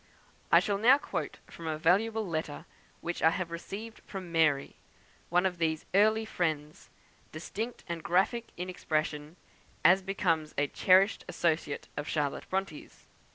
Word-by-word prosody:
I - - +8
shall 200 -1 -1
now 250 +6 +7
quote - - -4
from 165 - -9
a 155 -1 -1
valuable 210 +7 +2
letter 155 -3 -4 0.4
which 175 0 -4
I 160 - +6
have 170 0 -3
received 205 +6 -7
from 185 -3 -7
"Mary," 155 -4 +2 0.5
one 180 +2 +3
of 180 -2 -1
these 160 -2 0
early 215 +3 +4
friends; 155 -7 -3 0.4
distinct 220 +9 -5
and 170 -2 -4
graphic 195 +8 +1
in 180 +1 -4
expression, 155 -3 -2 0.5
as 185 +4 +7
becomes 165 -5 -1
a 145 - +3
cherished 190 +7 +3
associate 160 -3 -1
of 145 - -3
Charlotte 145 -3 -2
Bronte's. 190 -5 -4
175 Hz, 145 wpm, -30 LUFS, 155-195 Hz, 0.5 s, I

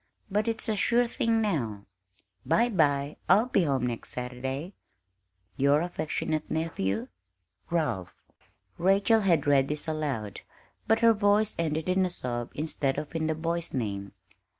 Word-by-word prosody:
But 210 +3 +1
it's 225 -1 -1
a 220 - +1
sure 240 +4 +3
thing 230 -1 +1
now. 115 - -2 0.6
Bye 235 +1 +3
bye; 145 -7 +1
I'll 200 +6 +6
be 200 -8 +2
home 135 -4 +1
next 120 -2 -4
Saturday. 130 +7 -4 0.8
Your 140 +2 +4
aff. 175 -2 -7 0.5
nephew, 110 -11 -1 0.6
Ralph. 150 - -1 0.6
Rachel 200 +5 +4
had 170 -7 +2
read 140 -2 +4
this 150 +2 -4
aloud, 140 -10 -3 0.5
but 225 0 +3
her 230 -1 +6
voice 205 0 +2
ended 160 0 -1
in 185 +1 +2
a 185 - +1
sob 120 -7 -4
instead 145 -3 -1
of 150 - -5
in 160 -1 0
the 160 - 0
boy's 170 0 -2
name. 100 -5 -3
160 Hz, 145 wpm, -28 LUFS, 135-195 Hz, 0.8 s, I'll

